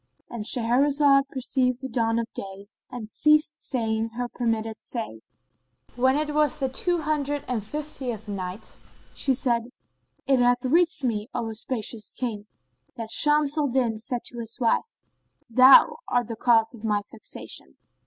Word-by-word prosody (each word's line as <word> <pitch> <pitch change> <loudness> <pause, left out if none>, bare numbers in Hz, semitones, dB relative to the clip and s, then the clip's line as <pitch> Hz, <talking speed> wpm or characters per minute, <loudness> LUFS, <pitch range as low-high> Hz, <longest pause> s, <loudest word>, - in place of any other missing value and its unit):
"—And 230 -3 -5
Shahrazed 275 +4 +3
perceived 255 -1 0
the 265 - -5
dawn 230 -3 0
of 230 - 0
day 195 0 -7 0.2
and 240 -4 -7
ceased 300 +5 +3
saying 225 -6 -1
her 245 0 -2
permitted 225 -2 -2
say, 220 - -5 0.7
When 260 +2 +3
it 300 0 -2
was 300 -2 +2
the 265 - -1
Two 345 +6 +1
Hundred 290 -1 -1
and 240 -5 -2
Fiftieth 250 -4 -6
Night, 190 +1 -7 0.3
She 265 -2 +3
said, 235 -3 0 0.6
It 270 -2 +3
hath 245 +1 +2
reached 330 +2 +2
me, 220 -4 -1
O 235 -2 -2
auspicious 220 -1 -4
King, 215 -5 -4 0.5
that 225 -1 -6
Shams 295 +1 +3
al 295 - +2
Din 240 -4 0
said 240 +1 -4
to 240 - -3
his 230 -1 -5
wife, 245 - 0 0.5
"Thou 260 - +7
art 245 -2 0
the 230 - -4
cause 225 0 +3
of 230 -2 -13
my 210 -2 0
vexation." 65 0 -6
245 Hz, 155 wpm, -25 LUFS, 225-275 Hz, 0.7 s, Thou